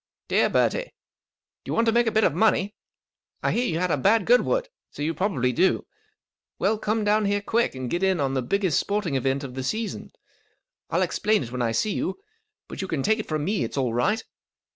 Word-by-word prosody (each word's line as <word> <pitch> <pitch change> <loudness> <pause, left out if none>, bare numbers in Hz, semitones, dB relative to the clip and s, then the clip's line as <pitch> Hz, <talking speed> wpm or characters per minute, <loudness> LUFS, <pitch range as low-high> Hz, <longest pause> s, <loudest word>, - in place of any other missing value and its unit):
Dear - - +3
Bertie, - - +2 0.8
—Do - - -11
you - - -1
want 230 - +3
to 225 - +3
make 235 +1 +3
a - - +2
bit 220 0 +2
of - - +3
money? 205 +1 +2 0.7
I - - +2
hear 245 +1 +1
you 160 - -1
had 180 0 0
a - - +2
bad 205 - +3
Goodwood, 480 - +3 0.2
so 145 - -6
you 160 +2 0
probably 150 - 0
do. 190 +10 +2 0.7
Well, 210 +2 +1
come 215 0 0
down 210 +1 +2
here 205 0 +1
quick 225 - 0
and 130 -1 -4
get 175 +8 -2
in 190 -2 +2
on 135 -2 0
the 130 - 0
biggest 185 +5 +1
sporting 200 -6 -1
event 135 +1 0
of 130 -2 -7
the 130 - -4
season. 215 - -3 0.8
I'll - - +1
explain 215 -9 +1
when 125 +1 -4
I 115 -2 +1
see 205 - 0
you, 310 - -2 0.5
but - - -6
you 190 - -3
can 155 -7 -2
take 220 +1 +2
it 215 - -5
from 155 -2 -2
me 205 +3 0
it's - - -5
all 125 -4 0
right. 210 - +1
190 Hz, 220 wpm, -25 LUFS, 140-220 Hz, 0.8 s, Dear